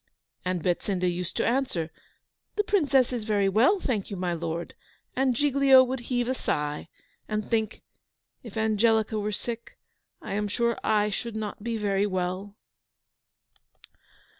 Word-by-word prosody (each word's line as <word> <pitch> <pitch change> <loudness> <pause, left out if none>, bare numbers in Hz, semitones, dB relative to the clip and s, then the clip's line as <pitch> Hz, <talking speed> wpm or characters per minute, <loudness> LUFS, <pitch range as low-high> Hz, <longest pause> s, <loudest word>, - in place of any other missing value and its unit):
And 180 -3 -1
Betsinda 180 +1 0
used 180 0 -3
to - - +1
answer, 230 -11 0 0.6
"The 415 - +2
Princess 280 -11 +3
is 240 -3 -2
very 205 -2 +2
well, 235 - +4
thank 225 - -2
you, 200 - -5
my 180 -1 -1
lord." 170 0 -4 0.4
And 260 -1 +2
Giglio 275 -1 +6
would 260 +1 -2
heave 245 -2 +1
a 260 - +1
sigh 150 - -2 0.4
and 215 -1 -2
think, 220 -2 0 0.6
"If 225 -3 -9
Angelica 220 0 +2
were 210 +1 -1
sick, 230 +2 -5 0.4
I - - -6
am 210 +1 0
sure 235 +3 +1
I 210 -1 +2
should 230 +2 -4
not 210 -1 -4
be 230 -1 -1
very 200 -1 +1
well." 185 +1 -3
215 Hz, 145 wpm, -27 LUFS, 190-245 Hz, 0.6 s, Giglio